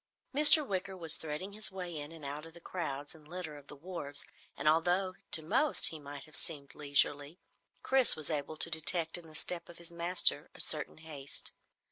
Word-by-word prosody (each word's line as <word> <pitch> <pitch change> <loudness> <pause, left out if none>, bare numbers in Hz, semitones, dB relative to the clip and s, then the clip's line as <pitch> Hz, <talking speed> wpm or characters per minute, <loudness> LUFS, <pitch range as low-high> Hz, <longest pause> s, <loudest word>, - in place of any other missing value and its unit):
Mr. 300 +1 +9
Wicker 190 -1 -3
was 165 -3 -1
threading 160 +6 -6
his 210 -2 0
way 180 -3 -6
in 145 0 -6
and 160 -3 -11
out 145 +3 -6
of 165 - -14
the - - -11
crowds 145 -5 -5
and 155 -2 -17
litter 175 -3 -6
of 145 -1 -14
the - - -10
wharves, 145 -3 -6 0.3
and 140 - -2
although 175 +4 +2 0.2
to 160 - +3
most 260 - +3
he 160 - -7
might 145 -1 -9
have 155 - -11
seemed 150 -5 -2
leisurely, 145 +1 0 0.5
Chris 265 -2 +5
was 155 0 -5
able 150 +1 -3
to 165 - +2
detect 165 +1 +2
in 175 -2 -3
the 155 - -14
step 170 +1 -3
of 170 - -12
his 170 0 -8
master 170 -3 +1
a - - -14
certain 150 - +2
haste. 150 -4 -4
160 Hz, 200 wpm, -32 LUFS, 150-180 Hz, 0.5 s, Mr